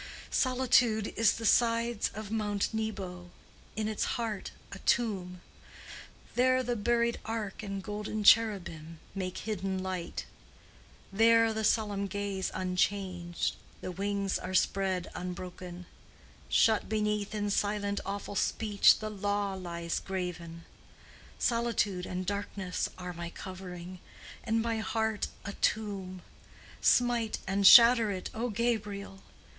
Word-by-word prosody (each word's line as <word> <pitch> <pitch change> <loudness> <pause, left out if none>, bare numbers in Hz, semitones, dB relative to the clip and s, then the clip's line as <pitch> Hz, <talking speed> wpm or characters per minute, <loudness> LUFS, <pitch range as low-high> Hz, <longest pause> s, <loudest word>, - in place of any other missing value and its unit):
Solitude 250 -4 +2
is 225 -2 +4
on - - -7
the 225 - -5
sides 230 0 +2
of 215 -1 -6
Mount 210 -1 -1
Nebo, 195 -5 -4 0.5
In 215 0 -1
its 215 -1 -1
heart 225 -4 -3 0.2
a 200 - -8
tomb: 190 -7 0 0.9
There 255 +1 +3
the 245 0 -1
buried 235 +2 +1
ark 220 -3 -4
and 195 -2 -5
golden 210 +1 -4
cherubim 185 -8 +3 0.2
Make 185 -2 -4
hidden 195 -3 -3
light: 185 -2 -4 0.9
There 225 +1 +5
the 220 0 -2
solemn 205 -2 +1
gaze 200 -1 -2
unchanged, 180 -1 -1 0.3
The 185 - -4
wings 200 +1 -1
are 185 +1 -4
spread 185 -1 +1
unbroken: 180 0 -7 0.6
Shut 220 -2 +3
beneath 210 -1 -1
in 205 -1 -1
silent 205 0 0
awful 200 +1 -5
speech 205 0 +4
The 215 0 -5
Law 205 -1 -1
lies 170 -3 -3
graven. 175 -3 -5 0.7
Solitude 230 -6 0
and 180 0 -4
darkness 200 -1 -3
are 180 -1 -6
my 170 0 -6
covering, 180 -1 -8 0.4
And 225 -1 +1
my 230 -1 -1
heart 220 -1 -1 0.2
a 200 - -4
tomb; 195 -5 -2 0.6
Smite 240 -3 +3
and 195 +1 +3
shatter 235 -1 +9
it, 185 -2 -4
O 235 +2 -2
Gabriel! 210 -3 -2
205 Hz, 120 wpm, -30 LUFS, 185-220 Hz, 0.9 s, shatter